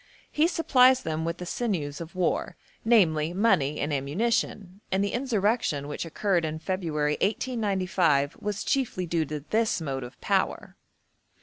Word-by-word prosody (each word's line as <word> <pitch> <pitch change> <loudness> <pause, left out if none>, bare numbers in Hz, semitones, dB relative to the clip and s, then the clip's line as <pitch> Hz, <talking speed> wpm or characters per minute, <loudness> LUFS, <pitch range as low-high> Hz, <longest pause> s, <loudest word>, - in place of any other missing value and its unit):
He 310 +2 +3
supplies 260 -7 +4
them 160 0 -2
with 165 +1 -2
the 180 - -6
sinews 170 -9 -2
of 170 +2 -9
war, 185 -1 -1 0.3
namely 170 -8 +3
money 180 -9 +2
and 145 +1 -1
ammunition, 195 - -1
and 190 +1 +2
the 200 - -1
insurrection 220 - 0
which 150 - -4
occurred 175 +1 0
in 155 0 -2
February 155 -4 -1
1895 190 - +1
was 205 -1 -3
chiefly 245 -9 -1
due 165 -1 0
to 150 0 -5
this 220 -3 +2
motive 135 -5 -5
power. - - -1
180 Hz, 140 wpm, -27 LUFS, 155-220 Hz, 0.3 s, supplies